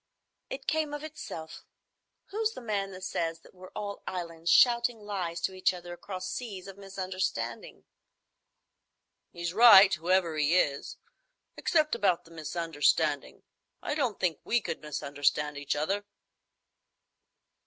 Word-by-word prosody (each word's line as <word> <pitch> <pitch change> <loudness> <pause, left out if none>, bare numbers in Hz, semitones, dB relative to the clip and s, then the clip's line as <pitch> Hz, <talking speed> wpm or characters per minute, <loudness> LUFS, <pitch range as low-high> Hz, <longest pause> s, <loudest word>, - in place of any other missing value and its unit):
"It 270 0 -6
came 310 -2 0
of 295 - -7
itself. 225 - -8 0.7
Who's 440 +2 0
the - - -9
man 205 -4 -2
that 185 -1 -10
says 165 -3 -2
that - - -19
we're 185 0 -12
all 205 -1 -5
islands 170 -2 -4
shouting 240 -1 +5
lies 185 -5 -3
to 190 - -1
each 185 0 +1
other 175 0 -8
across 185 +1 -6
seas 195 -1 -5
of 195 -1 -9
misunderstanding?" 190 -1 -4 1.5
"He's 170 -1 -4
right, 205 -3 +9
whoever 175 0 +1
he 155 +4 +3
is,—except 310 - -2
about 200 -6 +1
the 165 - -17
misunderstanding. 155 -2 0 0.4
I - - -1
don't 255 -9 -1
think 170 -5 0
we 240 - +2
could 165 - -5
misunderstand 150 0 -1
each 145 0 -1
other." 195 +8 -1
185 Hz, 130 wpm, -29 LUFS, 165-215 Hz, 1.5 s, right